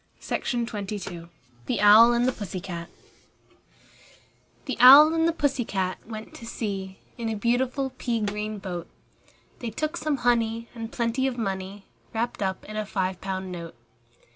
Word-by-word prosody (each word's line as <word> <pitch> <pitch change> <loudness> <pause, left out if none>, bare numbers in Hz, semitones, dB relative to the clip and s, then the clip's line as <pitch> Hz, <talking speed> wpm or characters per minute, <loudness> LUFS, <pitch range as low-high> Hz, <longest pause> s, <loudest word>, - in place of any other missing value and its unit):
ANONYMOUS 205 -7 -3 0.4
THE - - 0
OWL 215 +3 +8
AND 240 +1 +2
THE - - +3
PUSSY 205 -5 -6
CAT 170 -2 -7
I - - -31 1.1
The 265 -5 -3
Owl 280 +6 +10
and 325 0 +2
the - - +3
Pussy 285 -6 0
cat 190 -4 -2
went 220 -1 -8
to 230 - -10
sea 195 -4 -4 0.2
In 230 -1 -2
a 220 - -2
beautiful 250 +5 0
pea 235 -2 -1
green 210 0 -3
boat: 180 -4 -6 0.7
They 240 - -4
took 310 +9 -3
some 305 -4 -1
honey, 230 -1 +1
and 230 -1 -7
plenty 235 +3 0
of 255 -2 -3
money 195 -2 -4 0.3
Wrapped 235 0 -2
up 190 -1 -2
in 215 - -7
a 215 - -1
five 190 -2 -2
pound 190 -1 -4
note. 170 -4 -7
220 Hz, 160 wpm, -26 LUFS, 195-245 Hz, 1.1 s, Owl